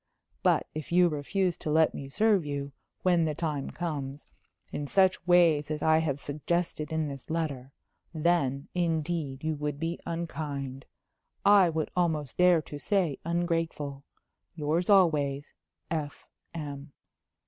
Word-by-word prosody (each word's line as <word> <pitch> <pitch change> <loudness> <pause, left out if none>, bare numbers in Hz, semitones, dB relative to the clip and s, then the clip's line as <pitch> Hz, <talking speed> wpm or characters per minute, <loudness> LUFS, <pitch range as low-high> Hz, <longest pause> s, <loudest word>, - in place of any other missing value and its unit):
But - - +3
if 155 0 -6
you 175 0 +5
refuse 175 +5 -1
to - - -5
let 160 +1 +4
me 135 - -7
serve 210 +3 +3
you, 140 -1 -4 0.3
when 175 -3 +3
the 155 -1 -1
time 150 -4 -2
comes, 145 -5 -4 0.5
in 145 - -3
such 185 +1 +2
ways 165 -5 +4
as 155 -1 -3
I 160 0 +5
have 145 -4 -1
suggested 155 +1 -2
in 160 -1 0
this 140 -2 -8
letter, 145 -5 -3 0.4
then, 155 -5 +1
indeed, 160 -5 -1
you 160 0 0
would 145 -1 -3
be 165 +2 -2
unkind 145 -5 -4 0.6
I 200 -3 +7
would 160 -1 -2
almost 160 -6 0
dare 180 -3 +5
to 145 - -8
say 175 -4 0
ungrateful! 165 -5 -1 0.5
Yours 160 +4 0
always 150 -8 +3 0.4
"F.M." 145 -1 -6
155 Hz, 135 wpm, -29 LUFS, 145-170 Hz, 0.6 s, I